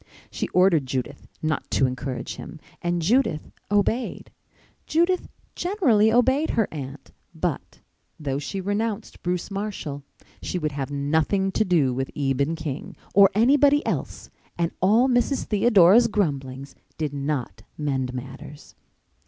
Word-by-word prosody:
She - - -3
ordered 180 -7 +3
Judith 130 -1 -4 0.2
not 155 -1 -1
to 135 - +2
encourage 130 0 -4
him - - -9 0.2
and 175 -1 -1
Judith 220 - +1 0.2
obeyed. 205 +4 0 0.6
Judith 345 +3 +1 0.3
generally 275 - +3
obeyed 260 +6 +3
her 225 -3 +1
aunt; 140 -2 -8 0.2
but, - - -4 0.4
though 140 -2 -2
she 190 +7 -4
renounced 205 +2 -3
Bruce 180 +2 -2
Marshall, 195 -8 -4 0.4
she - - -3
would 155 -3 -1
have 140 -1 -4
nothing 160 +7 0
to 215 - +1
do 165 -10 +2
with 130 +1 -2
Eben 140 +2 0
King 155 -3 -6 0.2
or 195 0 +7
anybody 285 +6 +4
else - - -4 0.3
and 170 -1 0
all 220 +7 +4
Mrs. 250 +2 +1
Theodora's 210 0 +5
grumblings 140 - -2 0.2
did 150 -3 -2
not 140 -3 -3 0.2
mend 135 -4 -1
matters. 135 +4 -9
175 Hz, 130 wpm, -24 LUFS, 140-215 Hz, 0.6 s, or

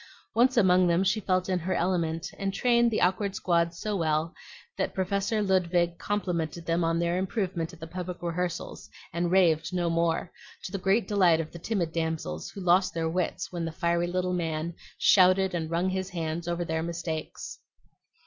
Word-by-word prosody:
Once 250 +3 +3
among 185 -4 +5
them 170 +2 +3
she 195 +3 +2
felt 185 -2 0
in 185 -1 0
her 185 +3 -2
element, 170 -2 -1
and 195 0 -2
trained 240 -1 +3
the 220 - -1
awkward 190 +2 +1
squad 170 -1 +1
so 205 +5 -4
well 160 -1 0 0.4
that - - -2
Professor 200 +3 0
Ludwig 175 -3 +1
complimented 170 -5 -2
them 170 +1 +1
on 165 0 +1
their 170 +1 0
improvement 185 -4 -2
at 175 - -14
the 160 - -6
public 180 +1 -6
rehearsals, 175 0 -3 0.2
and 170 +1 0
raved 170 -3 +3
no 175 -2 0
more, 165 0 0 0.3
to - - -6
the 195 - -3
great 195 +5 +2
delight 185 -6 +4
of 160 -1 -4
the 170 - -9
timid 175 -3 -1
damsels, 160 - -3
who 200 - -9
lost 180 +1 +3
their 165 -1 0
wits 180 +1 -2
when 175 -2 -3
the 165 - -3
fiery 170 +1 0
little 180 +1 -1
man 165 -1 -2 0.2
shouted 185 0 +5
and 165 -2 -2
wrung 170 +2 0
his 190 0 -2
hands 165 -1 -3
over 175 0 -1
their 160 0 -1
mistakes. 165 -1 -5
175 Hz, 185 wpm, -28 LUFS, 165-190 Hz, 0.4 s, among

